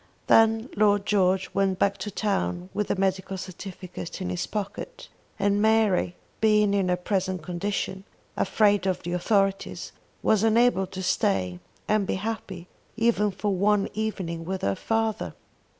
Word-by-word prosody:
Then 225 +1 +4
Lord 205 -1 +3
George 190 -2 +2
went 195 -1 +1
back 200 +1 +1
to 210 - -4
town 190 -3 -2
with 210 - -1
the - - 0
medical 190 0 -1
certificate 185 -1 -7
in 185 -1 -3
his 175 -1 -2
pocket, 215 - -5 0.3
and 205 0 +2
Mary, 215 -5 +3 0.2
being 210 -2 +4
in 195 -2 +1
her 180 - +3
present 185 -1 -2
condition, 190 +2 -3 0.3
afraid 205 0 +2
of 185 -1 -1
the 175 - -3
authorities, 195 +1 0 0.3
was 215 -2 +3
unable 225 -3 +3
to 190 +1 -6
stay 95 - 0 0.3
and 210 -2 +2
be - - 0
happy 190 -3 -5 0.3
even 225 -2 +2
for 200 +1 -2
one 200 +2 +2
evening 185 -6 -3
with 190 +2 -4
her 100 - +2
father. 225 - -1
195 Hz, 150 wpm, -26 LUFS, 185-210 Hz, 0.3 s, Then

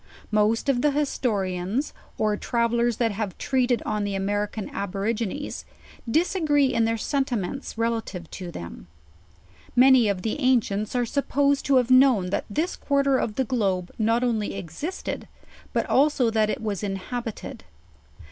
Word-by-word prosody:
Most 215 +3 +2
of 260 -3 +2
the 295 - +4
historians, 220 -5 -1 0.2
oj 215 -1 0
travel 235 0 0
lers 235 -1 +1
that 230 -2 +1
have 205 -3 -4
treated 250 -3 +1
on 210 -1 -1
the 200 -1 -2
American 205 +2 -2
Aborigines, 210 +7 -3 0.5
disagree 300 -3 +2
in 230 -1 +2
their 225 0 0
sentiments 265 -2 -2
relative 225 -6 -2
to 180 -2 -6
them. 85 - -8 0.9
Many 255 -2 +6
of 195 -3 -1
the 225 +6 -2
ancients 235 -5 +1
are 245 -1 +2
supposed 280 +2 +1
to 280 - +4
have 250 -1 +3
known 255 -8 +5
that - - -1
this 315 - -1
quarter 275 -2 +1
of 210 - -2
the 265 - 0
globe 195 -7 -1
not 225 +2 +2
only 225 -5 0
existed, 195 - -5 0.4
bat - - 0
also 270 -4 +3
that 215 -1 +2
k - - -1
was 210 -4 -3
inhabited. 210 +4 -5
230 Hz, 145 wpm, -25 LUFS, 205-265 Hz, 0.9 s, Many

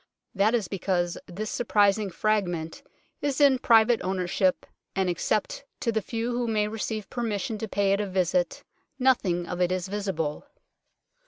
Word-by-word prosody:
That 210 +4 +3
is 215 -6 -1
because 175 -2 -1
this 210 +4 -5
surprising 205 -3 +2
fragment 175 -4 -1 0.4
is 285 -1 -1
in 275 -3 +5
private 230 0 +5
ownership, 185 0 0 0.3
and 190 -1 +1
except - - -1 0.2
to 235 - +1
the 220 -1 0
few 230 +3 -3
who 240 0 -1
may 210 -2 +1
receive 215 -1 -4
permission 225 -1 -2
to 220 - -3
pay 200 -1 +1
it 200 - +1
a 205 - -2
visit 190 +8 0 0.3
nothing 220 -10 +2
of 180 +1 -4
it 180 0 +2
is 185 0 -1
visible. 190 - -3
205 Hz, 155 wpm, -27 LUFS, 185-230 Hz, 0.4 s, in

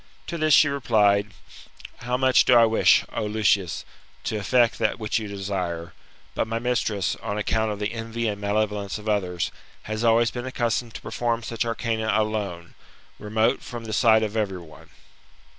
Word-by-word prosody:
To 170 - -5
this 155 -2 +5
she 150 - +6
replied, 105 -7 +2 0.7
How 125 +1 -2
much 130 0 +4
do 125 - +5
I 115 -1 +7
wish, 110 0 +4
O 115 - -2
Lucius, 105 -4 +1 0.4
to - - -2
effect 120 +3 +2
that - - +1
which 110 0 -1
you 110 - -6
desire; 90 -4 -4 0.4
but - - -1
my 115 +1 -2
mistress, 115 -7 -1
on 105 -1 -3
account 110 +1 0
of 105 - -4
the 105 +2 -3
envy 115 0 -3
and 105 -1 -3
malevolence 105 0 -1
of 105 0 -10
others, 90 -5 -1 0.3
has 110 +1 -4
always 115 0 +4
been 120 +1 -5
accustomed 120 -2 -2
to - - -7
perform 120 -1 -2
such 115 +1 -2
arcana 115 -1 -1
alone, 100 -6 -3 0.5
remote 110 +1 0
from 120 -2 -8
the 110 - -5
sight 110 0 +4
of 105 0 -3
every 100 -4 -1
one. 85 -3 -14
110 Hz, 175 wpm, -24 LUFS, 100-115 Hz, 0.7 s, I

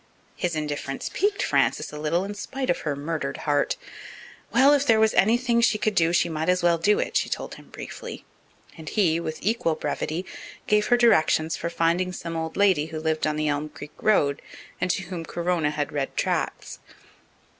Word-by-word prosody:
His 175 -2 -2
indifference 145 -2 -4
piqued 405 +1 +1
Frances - - +1
a 150 - -6
little 160 +4 0
in 200 +1 -5
spite 260 +5 -3
of - - -1
her 150 -2 -2
murdered 145 -1 -3
heart. 145 -1 +1 0.7
Well, 275 +2 +6
if 285 -1 +3
there 225 -6 +4
was 220 0 +4
anything 235 +3 +3
she 220 -2 +3
could 215 0 0
do 165 -3 +3
she 175 0 +3
might 160 0 -2
as 180 -1 +2
well 170 -1 +3
do 210 +6 +3
it, - - -2
she - - +1
told - - -4
him - - -13
briefly, - - -8 0.5
and 160 -2 -8
he, 170 -6 +2
with 160 -2 -4
equal 200 -6 +1
brevity, 165 +3 -3 0.4
gave 210 0 +2
her 245 - +4
directions 160 -8 +3
for 170 - -3
finding 170 +2 +1
some 170 -1 -5
old 160 0 -4
lady 185 -7 +3
who 160 -1 -5
lived 155 0 0
on 155 - 0
the 155 0 -1
Elm 150 +1 -1
Creek 150 0 -11
road 145 -10 +2 0.4
and 180 - 0
to 190 - 0
whom 175 -2 -6
Corona 170 -1 -1
had 150 -1 -3
read 140 -2 -3
tracts. - - -2
170 Hz, 195 wpm, -25 LUFS, 155-205 Hz, 0.7 s, Well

